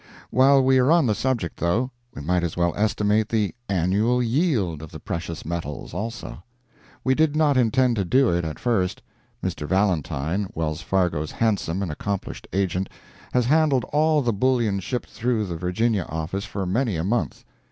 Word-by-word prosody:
While 135 +1 +5
we 130 0 +4
are 125 +2 +3
on 165 -2 +5
the 110 - +2
subject, 120 -7 -1
though, 110 +10 0 0.2
we 70 - -7
might 90 +3 +1
as 85 -1 -3
well 85 -1 +2
estimate 105 0 +1
the 110 -3 0 0.2
"annual 100 +7 +2
yield" 115 - 0
of 80 - -8
the - - -8
precious 85 -1 -5
metals, 80 -3 -5
also; 115 -4 -5 0.6
we 130 - +3
did 155 +1 +2
not 155 -2 +3
intend 125 0 +3
to 100 - +1
do 130 +6 +3
it 85 0 0
at 80 -1 -4
first. 100 -7 0 0.4
Mr. 75 - -3
Valentine, 95 -1 0
Wells 80 -1 -2
Fargo's 80 -3 0
handsome 100 -5 0
and 90 - -3
accomplished 100 +5 -4
agent, 95 0 -1 0.4
has 125 -1 +3
handled 145 -1 +3
all 155 0 +3
the 120 -2 +1
bullion 115 -2 +1
shipped 120 +6 -4
through 115 -2 0
the 90 -3 -4
Virginia 90 +3 0
office 80 +5 -3
for 100 -1 -4
many 110 +3 0
a 80 - -1
month. 115 +5 -1
105 Hz, 175 wpm, -24 LUFS, 85-125 Hz, 0.6 s, While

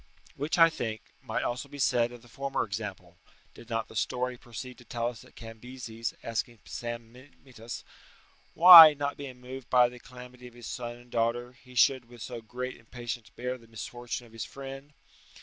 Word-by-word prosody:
Which, 145 +5 -2
I 165 -1 +7
think, 110 -6 -4 0.2
might 135 - -2
also 125 +3 -3
be 145 - -10
said 120 -3 +2
of 120 -1 -12
the - - -16
former 135 +3 -2
example, 95 -4 -6 0.3
did 120 - -14
not 115 -1 -1
the - - -14
story 125 +4 -1
proceed 125 +1 -9
to - - -14
tell 120 0 -2
us 120 -2 -10
that 130 - -18
Cambyses 115 0 -7
asking 115 +1 -3
Psammenitus, 120 0 -8 0.7
"Why, 165 -3 +12
not 145 0 -2
being 130 -3 -8
moved 130 0 -9
at 125 -1 +6
the 125 - -12
calamity 125 0 -12
of 120 - -15
his 120 -1 -11
son 120 -1 -5
and 120 0 -18
daughter, 120 +1 0
he 125 0 -18
should 130 0 +4
with 120 -2 -11
so 120 +1 -6
great 125 +3 -6
impatience 120 -1 -7
bear 125 +3 -5
the 115 - -18
misfortune 120 +2 -6
of 115 - -18
his 115 - -5
friend?" 135 +1 -9
120 Hz, 185 wpm, -29 LUFS, 115-130 Hz, 0.7 s, Why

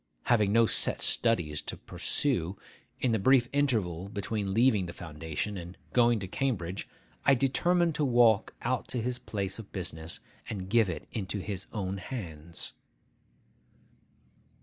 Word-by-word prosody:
Having 105 -5 +3
no 115 +2 +6
set - - +2
studies 85 -11 +3
to - - -5
pursue, 100 - -1 0.4
in 125 - +1
the 110 - +2
brief 130 +3 +5
interval 100 - 0
between 100 -1 -2
leaving 110 -3 +3
the 85 - -6
Foundation 80 +4 -4
and 85 +1 -9 0.2
going 120 -1 +5
to 100 -3 -4
Cambridge, 95 -5 -2 0.3
I 140 - +6
determined 170 +6 +2
to 150 - 0
walk 120 -5 +4
out 125 +1 0
to 125 - -2
his 125 +1 -2
place 100 -3 -3
of 110 - -10
business, 85 -3 -4 0.3
and 95 -3 -5
give 115 -4 +4
it 80 -4 -5
into 105 -2 -3
his 100 -1 -5
own 100 -3 -3
hands. 85 - -6
105 Hz, 145 wpm, -30 LUFS, 90-120 Hz, 0.4 s, no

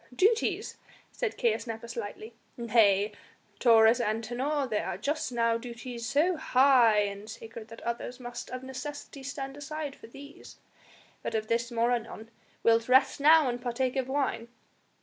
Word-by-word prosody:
"Duties?" 435 - +1 0.3
said 485 -4 -3
Caius 230 +1 0
Nepos 230 +1 -6
lightly; 220 0 -6 0.2
"nay, 215 -4 +3 0.5
Taurus 230 0 +6
Antinor, 240 +6 -1
there 215 -3 -2
are - - -3
just 295 -2 -2
now 230 -1 +1
duties 235 -1 -7
so 330 +6 +2
high 255 -7 +5
and 200 +1 -4
sacred 225 0 -9
that 230 0 -12
others 235 +1 -4
must 240 -1 -7
of 255 0 -6
necessity 280 +2 -7
stand 270 0 -6
aside 290 0 -5
for - - -14
these! 280 +5 -13 0.6
But - - -4
of 215 0 -2
this 235 +1 0
more 235 +1 +1
anon. 230 -1 -4 0.3
Wilt 230 +1 +3
rest 265 +2 +4
now 310 0 +6
and 245 0 -2
partake 250 +1 -1
of 260 -2 -1
wine?" 265 -4 -1
240 Hz, 150 wpm, -29 LUFS, 230-270 Hz, 0.6 s, Taurus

